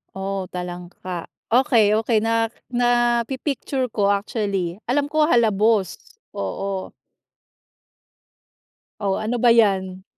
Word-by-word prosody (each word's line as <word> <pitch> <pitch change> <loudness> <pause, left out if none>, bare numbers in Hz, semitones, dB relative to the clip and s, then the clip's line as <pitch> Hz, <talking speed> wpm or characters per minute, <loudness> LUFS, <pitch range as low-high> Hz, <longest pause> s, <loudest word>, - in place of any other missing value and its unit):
Oh, 195 -1 -3
talangka. 180 0 -7 0.2
Okey, 240 -5 +4
okey. 225 0 +1
Na 225 0 +1 0.2
napi-picture 245 +2 0
ko 200 -2 +2
actually. 200 -3 -1
Alam 285 +3 +2
ko 310 0 +3
halabos, 215 - +2 0.4
oo. 195 -1 -4 2.1
O, 195 -2 0
ano 220 +4 -2
ba 245 - +3
yan? 190 -5 +3
215 Hz, 95 wpm, -22 LUFS, 190-240 Hz, 2.1 s, Okey